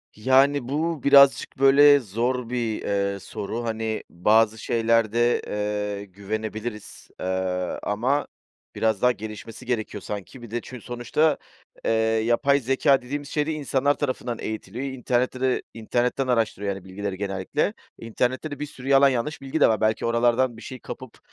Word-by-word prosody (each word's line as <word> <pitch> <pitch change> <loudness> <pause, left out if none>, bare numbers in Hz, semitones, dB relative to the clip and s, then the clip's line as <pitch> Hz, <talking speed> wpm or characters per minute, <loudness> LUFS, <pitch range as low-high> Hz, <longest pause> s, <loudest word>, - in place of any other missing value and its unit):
Yani, 130 +3 +3
bu 160 +1 -1
birazcık, 140 -1 +5
böyle, 145 +1 +7
zor 120 +2 -2
bir, 120 -3 -2 0.3
eee, 100 - -7
soru. 110 +5 -5
Hani, 110 -1 -3
bazı 110 +5 +3
şeylerde, 115 +1 +2
eee, 105 -1 -3
güvenebiliriz, 105 +3 -6
eee, - - -4 0.6
ama 125 +8 0 0.5
biraz 110 -3 0
daha 125 - +5
gelişmesi 110 +2 -8
gerekiyor 110 -4 -3
sanki. 105 +5 -7
Bir 120 -2 -11
de, 120 - -2
çün 125 +1 -9
sonuçta, 120 +7 0 0.5
eee, - - +2 0.3
yapay 140 +4 +3
zekâ 135 +1 +2
dediğimiz 145 +3 -5
şey 150 -1 0
de - - 0
insanlar 145 -1 +1
tarafından 125 -4 -3
eğitiliyor. 110 +4 -5
İnternette 125 -1 -1
de 130 -1 +1
internetten 120 +4 -1
araştırıyor, 110 -5 0
yani, 95 -1 -11
bilgileri 95 0 -5
genellikle. 100 - -1 0.2
İnternette 125 +6 -2
de 145 - -6
bir 150 - -2
sürü 135 -2 -11
yalan 140 0 +6
yanlış 130 +4 -2
bilgi 135 +3 -3
de - - +6
var. 110 -1 0
Belki 110 0 +1
oralardan 120 +1 +2
bir - - -11
şey 130 0 -8
kapıp 130 -3 -9
120 Hz, 150 wpm, -24 LUFS, 110-135 Hz, 0.6 s, böyle